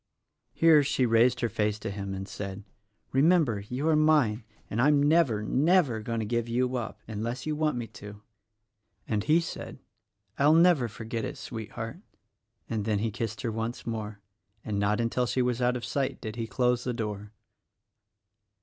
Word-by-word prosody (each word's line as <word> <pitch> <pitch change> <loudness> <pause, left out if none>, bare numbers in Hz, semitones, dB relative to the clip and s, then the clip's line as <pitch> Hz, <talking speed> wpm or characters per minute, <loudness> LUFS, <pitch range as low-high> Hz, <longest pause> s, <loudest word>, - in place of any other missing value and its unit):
Here 160 -2 +6
she 140 -2 +1
raised 115 +1 +3
her 120 - +2
face 105 -1 -1
to 105 - -5
him 100 -1 -5
and 95 0 -6
said, 100 0 -6 0.5
"Remember, 145 - +3
you 125 +9 -3
are 160 - +4
mine; 150 -8 +3 0.2
and 110 - -1
I'm 145 +1 +4
never, 145 -9 +3
never, 145 - +2
going 115 +1 -3
to 110 - -2
give 120 +1 -1
you 125 +2 0
up 110 -3 -4
— - - -37
unless 115 +3 -4
you 155 -1 -1
want 155 -3 0
me 120 - -3
to." 105 -2 -11 0.9
And 105 -2 0
he 155 +6 +4
said, 165 - -6 0.6
"I 140 - +4
will 155 - +6
never 165 -7 +5
forget 110 +1 -5
it, - - -5
Sweetheart," 115 - -6 0.7
and 110 -3 -2
then 105 0 0
he 110 +2 -1
kissed 110 +1 -4
her 115 - -2
once 115 +2 -4
more 110 -3 -5 0.2
— 105 +2 -41
and 105 -2 -2
not 100 +2 +1
until 120 +1 0
she 125 +4 +1
was 125 0 -1
out 125 0 +2
of 120 - -6
sight 130 +2 -2
did 110 -1 -6
he 115 -1 -3
close 125 +1 +1
the 125 - -2
door. 105 -2 -4
115 Hz, 185 wpm, -28 LUFS, 105-135 Hz, 0.9 s, Here